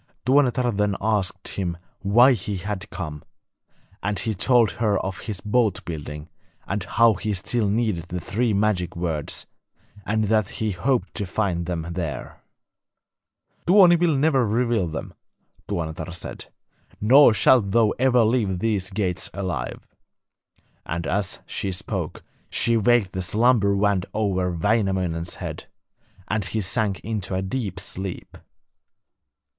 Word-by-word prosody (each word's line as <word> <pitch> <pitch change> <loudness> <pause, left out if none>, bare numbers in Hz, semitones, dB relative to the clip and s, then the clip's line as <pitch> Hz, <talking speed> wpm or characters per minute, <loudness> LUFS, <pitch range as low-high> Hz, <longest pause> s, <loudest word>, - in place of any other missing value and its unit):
Tuonetar 130 -2 +3
then 105 -1 +1
asked 100 -3 -1
him 90 -3 -3 0.2
why 120 +7 +5
he 100 -2 -3
had 100 +2 -5
come, 75 -5 -6 0.8
and 105 +1 -1
he 110 - -1
told 120 +3 +3
her 105 -3 +1
of 95 -1 -4
his 100 0 -5
boat 105 -3 +1
building, 75 -2 -6 0.4
and 100 -1 -2
how 115 0 +4
he 105 +2 -2
still 105 +3 0
needed 105 -6 0
the 90 +1 -4
three 115 +7 -1
magic 100 -4 0
words, 80 -4 -2 0.6
and 110 +2 +1
that 110 -1 +2
he 110 -1 -1
hoped 120 +8 0
to 105 - -3
find 90 -4 -1
them 85 -3 -3
there. 85 -4 -5 1.3
'Tuoni 180 -1 +7
will 170 -3 +2
never 135 -2 +3
reveal 115 -3 +1
them,' 80 0 -6 0.5
Tuonetar 80 -3 -4
said; 90 - -7 0.5
'nor 130 +6 +7
shalt 110 0 +4
thou 110 +1 +3
ever 125 -2 +4
leave 110 -5 +1
these 100 -2 0
gates 95 -2 -1
alive;' 85 -12 -4 1.0
and 85 +2 -4
as 100 0 -1
she 95 - -3
spoke 90 - -4 0.3
she 115 - +1
waved 115 -3 +3
the 95 - -3
slumber 105 +2 +3
wand 100 -2 +1
over 95 -4 0
Wainamoinen's 90 -3 0
head, - - -7 0.6
and 110 0 -1
he 110 - -2
sank 100 -1 -1
into 100 -3 -3
a 95 - -1
deep 95 -3 -3
sleep. 95 0 -6
100 Hz, 135 wpm, -24 LUFS, 90-115 Hz, 1.3 s, Tuoni